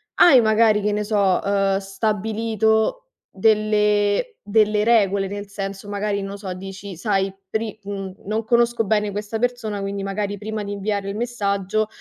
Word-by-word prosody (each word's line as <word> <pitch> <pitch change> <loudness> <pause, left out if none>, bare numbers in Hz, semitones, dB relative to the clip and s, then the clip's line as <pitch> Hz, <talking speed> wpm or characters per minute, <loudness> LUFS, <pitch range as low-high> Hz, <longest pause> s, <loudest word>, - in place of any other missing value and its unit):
hai 280 -7 +7
magari, 220 -1 +4
che 210 0 0
ne 210 - -1
so, 200 -3 +2
ehm, 195 -1 +1
stabilito 220 - 0 0.2
delle 210 - +2
delle 210 0 +2
regole, 200 -4 +3
nel 205 +1 -6
senso 195 0 -6
magari 205 0 -1
non 195 0 -5
lo 200 - -6
so, 195 -2 -6
dici: 195 +1 -8
"Sai 195 -1 0 0.2
pri" 220 -1 -3
mhmm, 195 -2 -6
"non 215 +3 -1
conosco 235 0 +2
bene 210 0 +1
questa 210 +2 -4
persona 225 -4 -2
quindi 195 0 -3
magari 200 +1 -3
prima 215 +1 -4
di 200 - -5
inviarle 200 0 -2
il 200 - -4
messaggio, 210 -3 -1
205 Hz, 160 wpm, -22 LUFS, 200-220 Hz, 0.2 s, hai